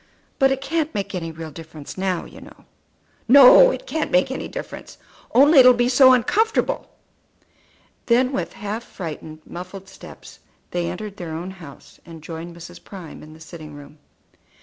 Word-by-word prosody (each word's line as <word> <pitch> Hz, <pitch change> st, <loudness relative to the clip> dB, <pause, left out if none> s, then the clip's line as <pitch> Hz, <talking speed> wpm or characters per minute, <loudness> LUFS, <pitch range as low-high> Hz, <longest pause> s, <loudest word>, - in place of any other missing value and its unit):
But 270 Hz, -1 st, +4 dB
it 270 Hz, 0 st, -2 dB
can't 315 Hz, +2 st, -2 dB
make 200 Hz, 0 st, -3 dB
any 165 Hz, -3 st, -4 dB
real 160 Hz, 0 st, -9 dB
difference 155 Hz, -1 st, -11 dB
now, 185 Hz, -2 st, -2 dB
you -, -, -14 dB
know." -, -, -16 dB, 0.6 s
"No; 280 Hz, -, +8 dB
it -, -, -5 dB
can't 320 Hz, -10 st, -3 dB
make 180 Hz, +8 st, +2 dB
any 265 Hz, -, -5 dB
difference. -, -, -9 dB, 0.3 s
Only 280 Hz, +4 st, +6 dB
it 255 Hz, -, +8 dB
will 250 Hz, -, +7 dB
be 240 Hz, +1 st, +1 dB
so 260 Hz, +1 st, +6 dB
uncomfortable." 440 Hz, -, +1 dB, 1.2 s
Then 250 Hz, +2 st, +3 dB
with 180 Hz, -10 st, -4 dB
half 210 Hz, +3 st, -5 dB
frightened, 155 Hz, -5 st, -9 dB
muffled 185 Hz, +2 st, -9 dB
steps 190 Hz, -, -14 dB, 0.3 s
they 175 Hz, -1 st, -2 dB
entered 200 Hz, +3 st, -7 dB
their 165 Hz, -3 st, -6 dB
own 175 Hz, +3 st, -6 dB
house, 165 Hz, -7 st, -14 dB
and 165 Hz, -2 st, -13 dB
joined 165 Hz, +2 st, -8 dB
Mrs. 175 Hz, +1 st, -12 dB
Prime 185 Hz, -6 st, -11 dB
in 155 Hz, 0 st, -13 dB
the 160 Hz, -, -16 dB
sitting 160 Hz, -2 st, -11 dB
room. 145 Hz, +1 st, -14 dB, 0.3 s
Mrs. -, -, -34 dB
190 Hz, 170 wpm, -21 LUFS, 165-255 Hz, 1.2 s, No